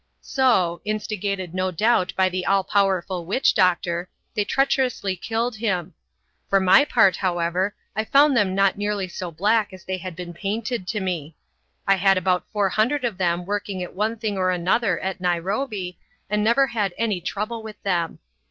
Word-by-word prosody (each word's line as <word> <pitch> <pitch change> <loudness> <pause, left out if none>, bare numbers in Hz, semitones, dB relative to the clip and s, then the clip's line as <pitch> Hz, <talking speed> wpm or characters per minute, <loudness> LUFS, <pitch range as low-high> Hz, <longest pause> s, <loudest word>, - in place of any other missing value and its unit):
So 195 -11 +2
instigated 200 -4 -3
no 185 0 0
doubt 185 +1 +2
by 190 0 +4
the 185 0 -2
all 195 -1 +3
powerful 190 -2 0
witch 205 +10 +2
doctor 175 -1 +1 0.2
they 210 - +1
treacherously 255 -6 0
killed 225 +5 -2
him. 190 -7 -1 0.6
For 195 - +4
my 190 +9 +6
part, 220 -9 +4
however, 180 +2 0 0.2
I 220 +1 -1
found 280 +3 +5
them 200 -5 +2
not 195 0 +2
nearly 205 -2 -1
so 180 0 -6
black 205 +6 +1
as 185 -1 -12
they 185 0 -3
had 185 -2 -7
been 175 0 -7
painted 215 +3 -3
to 210 +2 -1
me. 165 -5 -3 0.5
I 195 -1 +4
had 195 +1 +4
about 185 0 0
four 205 -2 +1
hundred 245 +7 +1
of 215 -6 -3
them 175 -1 0
working 200 -1 -3
at 180 - -8
one 215 +4 -1
thing 210 -3 -2
or 185 0 +2
another 185 +6 +1
at 190 -1 -4
Nairobi 185 +2 -2 0.3
and 210 0 +1
never 235 +5 +4
had 210 -8 -2
any 215 -6 0
trouble 215 +6 -3
with 220 -1 -10
them. 175 -4 -1
195 Hz, 175 wpm, -23 LUFS, 180-215 Hz, 0.6 s, my